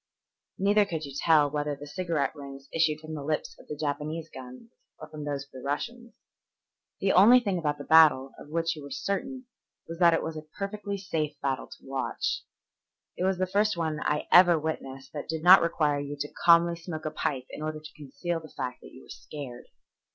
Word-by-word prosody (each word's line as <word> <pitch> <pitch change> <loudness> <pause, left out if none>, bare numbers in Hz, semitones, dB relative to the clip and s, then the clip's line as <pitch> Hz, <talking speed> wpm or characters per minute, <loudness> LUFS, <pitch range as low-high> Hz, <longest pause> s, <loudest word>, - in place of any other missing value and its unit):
Neither 205 +2 +4
could 160 -5 -4
you 140 - -9
tell 150 -2 +4
whether 145 0 -1
the 145 +1 -10
cigarette 160 -1 -2
rings 140 -1 -10
issued 160 -2 +2
from 155 0 -8
the 150 - -5
lips 155 +1 -2
of - - -16
the 150 - -5
Japanese 155 +2 -3
guns 130 - -11 0.3
or 155 - -10
from 155 -1 -8
those 140 -1 -3
of 140 - -34
the 130 - -10
Russians. 235 - -4 0.9
The 195 - +3
only 225 +7 +8
thing 200 -7 -1
about 150 -3 -1
that - - -9
battle 150 -4 +6
of - - -12
which 165 +1 -1
you 155 - -9
were 140 - -9
certain 200 - -3 0.4
was 165 0 -7
that 170 -2 +6
it - - -1
was 160 0 -4
a 155 - -5 0.2
perfectly 200 0 -4
safe 155 -6 -3
battle 135 -2 -2
to - - -14
watch. 135 - -2 0.7
It 180 - -1
was 190 -1 +1
the 185 - +1
first 205 +1 +1
one 160 -2 -1
I 150 0 -1
ever 175 -2 +8
witnessed 135 -4 -5
that 150 -1 -6
did 160 -1 -3
not 185 +2 +9
require 150 -3 +1
you 145 0 -5
to 145 - -5
calmly 170 0 +6
smoke 165 -2 -7
a 155 - -2
pipe 130 -4 -2
in - - -8
order 155 0 -3
to 155 0 -12
conceal 155 +4 -4
the 155 -1 -12
fact 125 -2 -5
that - - -13
you - - -14
were - - -19
scared. 135 -5 -9
155 Hz, 210 wpm, -28 LUFS, 145-175 Hz, 0.9 s, not